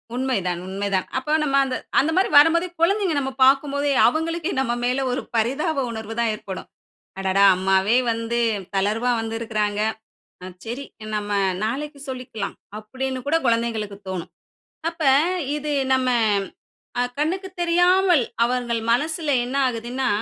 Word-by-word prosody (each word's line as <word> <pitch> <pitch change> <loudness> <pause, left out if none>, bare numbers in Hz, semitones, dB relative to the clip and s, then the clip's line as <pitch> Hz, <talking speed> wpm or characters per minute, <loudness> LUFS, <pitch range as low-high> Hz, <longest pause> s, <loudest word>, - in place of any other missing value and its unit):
உண்மை 260 -1 0
தான் 175 -1 -1
உண்மை 195 +2 -3
தான். 185 - -1
அப்ப 300 +4 0
நம்ம 275 -2 0
அந்த 260 -1 -3 0.2
அந்த 305 +4 +2
மாரி 375 +1 +3
வரும்போதே 335 +4 +4
குழந்தைங்க 380 -1 +2
நம்ம 265 -1 -3
பார்க்கும்போது 280 +1 +2 0.2
அவங்களுக்கே 330 +5 -1
நம்ம 240 -3 0
மேல 250 +2 +1
ஒரு 250 - -1
பரிதாப 275 +6 0
உணர்வு 220 -1 -6
தான் 230 -1 +2
ஏற்படும். 195 -3 -8 0.5
"அடடா! 195 +1 +2
அம்மாவே 190 +4 +3
வந்து 230 +1 -2 0.4
தளர்வா 215 +5 +1
வந்து 225 0 -4
இருக்கிறாங்க. 210 -2 -1 0.8
சரி 240 +5 -5 0.3
நம்ம 205 0 -3 0.3
நாளைக்கு 285 +6 -3
சொல்லிக்கெல்லாம்" 250 -6 -5 0.2
அப்டின்னு 260 +4 -4
கூட 310 +3 +2
குழந்தைகளுக்கு 225 -3 -1
தோன்னும். 185 -3 -5 0.6
அப்ப 335 -1 -8 0.5
இது 300 0 -3 0.2
நம்ம 260 -1 +1 0.9
அ - - +3 0.2
கண்ணுக்கு 365 +6 -1
தெரியாமல் 355 -1 +4 0.2
அவர்கள் 240 -1 -1
மனசுல 310 +4 0
என்ன 255 +3 -4
ஆகுதுன்னா, 245 +2 -2
255 Hz, 135 wpm, -23 LUFS, 220-300 Hz, 0.9 s, வரும்போதே